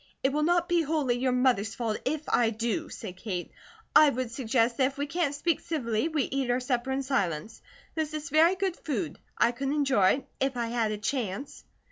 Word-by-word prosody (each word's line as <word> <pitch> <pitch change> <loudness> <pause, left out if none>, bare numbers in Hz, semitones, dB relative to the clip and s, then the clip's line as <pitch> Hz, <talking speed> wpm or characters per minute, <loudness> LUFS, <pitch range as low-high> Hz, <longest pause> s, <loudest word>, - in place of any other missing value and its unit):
"It 270 +1 +2
will 300 - +1
not 345 +2 +2
be 345 -1 +3
wholly 285 -6 0
your 255 0 +1
mother's 245 -4 +2
fault, 225 -3 -2
if 305 +3 -1
I 235 -2 +3
do," 235 +8 -2
said 190 -6 -8
Kate. 185 -3 -4 0.4
"I 305 - +8
would 255 -3 -3
suggest 235 -1 +1
that 260 - +4
if 275 - -7
we 285 - -1
can't 290 -1 -1
speak 330 +3 0
civilly, 240 -5 -1
we 310 -4 0
eat 270 -2 -2
our 245 +1 +2
supper 250 0 -1
in 270 +1 -1
silence. 210 - -2 0.3
This 310 -1 -2
is 300 -2 -5
very 325 +5 +5
good 380 -2 -1
food; 205 - -4 0.2
I 235 - +4
could 270 +3 -3
enjoy 270 -10 +3
it, 275 - -5
if 270 -1 0
I 235 -1 -1
had 230 -2 0
a 210 - -2
chance." 225 +2 -3
265 Hz, 210 wpm, -28 LUFS, 230-300 Hz, 0.4 s, I